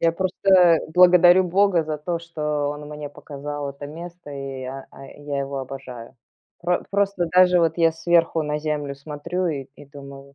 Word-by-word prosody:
я 165 0 +3
просто, 185 +2 -3
э, 175 -4 +6
благодарю 180 +1 +6
бога 185 -1 +2
за 155 -1 -4
то, 170 +3 -3
что 150 -3 -3
он 145 0 -6
мне 150 -1 -7
показал 145 0 -7
это 140 +1 -9
место, 170 +1 -10
и 135 -1 -6
я, 130 +1 -7
э, 135 +1 -13
я 145 -1 -3
его 140 0 -3
обожаю. 130 -2 -9 0.5
Пр 175 +1 -1
просто 200 -3 0
даже 180 0 +5
вот 165 0 +1
я 165 -1 +4
сверху 165 0 +1
на 150 0 -2
землю 150 -2 -3
смотрю 150 +6 -4
и 150 -5 -2
и - - -14
думаю 140 -1 -12
150 Hz, 180 wpm, -22 LUFS, 140-175 Hz, 0.5 s, э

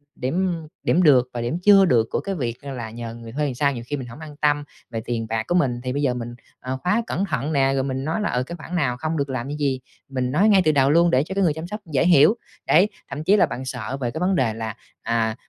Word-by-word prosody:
điểm 170 +5 -1 0.2
điểm 180 - +3
được 130 -5 +5
và 120 - -3
điểm 120 +7 -1
chưa 200 -1 +7
được 115 -8 +3
của - - 0
cái 195 -1 -4
việc 120 -5 -4
là 130 -5 -5
nhờ 115 0 -7
người 115 -1 -10
thuê 150 +4 -1
làm 130 -4 -3
sao 140 +1 +1
nhiều 120 - -6
khi 145 - -2
mình 130 -3 -6
hổng 120 +4 -11
an 155 -2 -9
tâm 145 -1 +2 0.3
về 115 -1 -3
tiền 115 -1 -2
bạc 110 -1 -1
của 175 - 0
mình 125 -8 +1
thì 125 0 -2
bây 145 - -1
giờ 135 -4 +2
mình, 120 -1 -6 0.2
ờ, 130 +1 -4
khóa 210 +6 +2
cẩn 195 - -1
thận 145 -3 -2
nè, 135 -1 +3
rồi 135 - 0
mình 130 0 -3
nói 160 +8 -1
là, 210 - 0
ờ, 125 +1 0
cái 170 +6 -7
khoản 170 +2 -7
nào 135 -8 0
không 155 +4 -2
được 140 -1 -1
làm 130 -1 -3
cái 145 +1 -4
gì, 140 -3 0 0.3
mình 130 -2 -2
nói 195 +9 +4
ngay 195 -2 +6
từ 155 - +5
đầu 135 -2 +3
luôn 170 +2 +5
để 130 +2 +3
cho 190 +4 -6
cái 200 - +2
người 160 - +3
chăm 160 +3 -6
sóc 210 +3 -5
dễ 135 +5 +3
hiểu. 170 +5 +6 0.3
Đấy, 185 +7 +5 0.2
thậm 150 +3 -5
chí 200 +5 +4
là - - +5
bạn 130 - -6
sợ 130 0 -4
về 120 -2 -1
cái 160 - -5
vấn 185 +2 +1
đề 120 -9 +1
là, 110 -1 -5 0.3
à, 115 -1 0
135 Hz, 290 wpm, -23 LUFS, 125-165 Hz, 0.3 s, chưa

